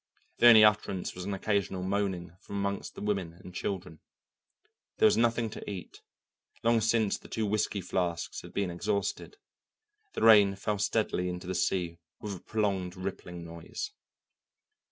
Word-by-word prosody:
The 120 - +8
only 110 -2 +10
utterance 105 -3 +2
was 90 0 -7
an 100 - -2
occasional 95 -2 -1
moaning 95 -3 -2
from - - -8
among 100 0 -1
the - - -8
women 100 -5 -1
and 90 +1 -13
children. 90 -4 -4 1.0
There - - +4
was - - +6
nothing 115 0 +2
to - - -7
eat; 95 -3 -8 0.6
long 115 0 +4
since 110 -1 +2
the - - -14
two 110 - -2
whisky 105 -1 0
flasks 85 -2 -2
had - - -11
been 100 -3 -1
exhausted. 100 - -2 0.8
The - - -3
rain 105 -3 +7
fell 105 +1 -2
steadily 100 -3 0
into 90 0 -5
the 95 - -3
sea 85 -2 -1 0.2
with 105 -2 -5
a - - -9
prolonged 100 -4 -1
rippling 90 -2 -6
noise. 85 0 -6
100 Hz, 155 wpm, -30 LUFS, 90-105 Hz, 1.0 s, only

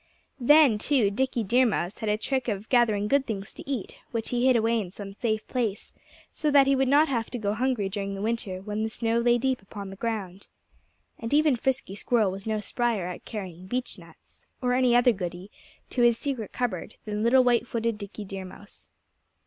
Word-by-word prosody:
Then, 270 -3 +6
too, 240 -6 +2
Dickie 245 +1 0
Deer 245 +5 +4
Mouse 190 -2 -2
had 220 -2 -2
a 210 - +2
trick 260 +3 -2
of 210 -1 -3
gathering 220 -5 +3
good 275 +3 +2
things 205 -2 -5
to - - -11
eat, 255 -8 -4
which 230 -2 -3
he 245 +1 +1
hid 255 - +5
away 230 0 +2
in 190 - -6
some 195 +1 -9
safe 220 0 -2
place, 225 -6 -2 0.4
so 305 - 0
that 280 -1 +6
he 275 0 +3
would 265 0 +2
not 290 +4 +5
have 235 -6 -1
to 245 - -4
go 205 -3 -1
hungry 240 -3 0
during 200 0 -4
the 195 - -6
winter, 210 -5 -2
when 210 +1 -3
the 220 - -1
snow 230 +1 0
lay 240 0 +4
deep 260 -1 0
upon 195 0 -8
the - - -8
ground. 200 -4 -4 0.7
And 230 +5 -1
even 300 -3 +4
Frisky 260 -4 -2
Squirrel 210 -1 +1
was 195 +3 -8
no 215 -1 0
spryer 225 -2 -1
at 180 0 -7
carrying 185 -5 -7
beechnuts 250 +4 -7
or 250 -2 0
any 250 -1 +3
other 245 0 +6
goody 185 -1 -6 0.4
to 250 - 0
his 240 -1 +5
secret 260 -7 -4
cupboard 220 -5 -3
than 210 -1 -3
little 250 +3 +5
white 240 -1 +2
footed 230 -2 -2
Dickie 205 +1 -7
Deer 195 0 -6
Mouse. 205 +2 -11
225 Hz, 205 wpm, -27 LUFS, 200-250 Hz, 0.7 s, Then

